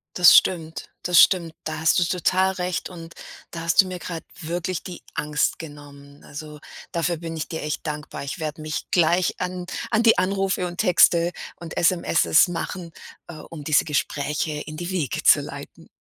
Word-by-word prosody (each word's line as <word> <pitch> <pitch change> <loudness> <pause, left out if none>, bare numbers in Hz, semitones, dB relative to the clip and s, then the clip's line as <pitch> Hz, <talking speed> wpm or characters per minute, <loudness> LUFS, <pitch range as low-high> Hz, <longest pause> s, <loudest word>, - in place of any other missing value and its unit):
Das 180 -1 +8
stimmt. 160 -3 +1
Das 180 -1 +4
stimmt. 170 -4 +3
Da 155 -1 -4
hast 160 +2 +3
du - - +3
total 185 +2 +1
recht 180 -1 -3
und 165 -2 -11 0.4
da 165 - -6
hast 165 +3 +5
du 190 - -6
mir 185 -1 -6
grad 165 0 -6 0.2
wirklich 175 +2 -3
die 180 -2 -9
Angst 150 0 -1
genommen. 145 -2 -12
Also, 150 0 -9 0.3
dafür 170 0 -1
bin 165 0 -6
ich 155 - -4
dir 160 - -5
echt 150 +2 -4
dankbar. 150 -1 -5
Ich 140 +5 -6
werde 155 0 -5
mich 155 -1 -4
gleich 175 +1 +2
an 180 0 -4 0.3
an 220 0 +2
die 230 - +5
Anrufe 195 -1 0
und 175 0 -8
Texte 175 -3 +4 0.3
und 165 -1 -9
SMS 170 -2 +3
machen, 175 0 -5 0.4
äh, 170 - -9
um 155 0 -10
diese 150 0 +3
Gespräche 150 +1 -2
in 155 0 -8
die 175 +2 -5
Wege 170 -9 -2
zu - - +6
leiten. - - -10
165 Hz, 180 wpm, -23 LUFS, 155-180 Hz, 0.4 s, Das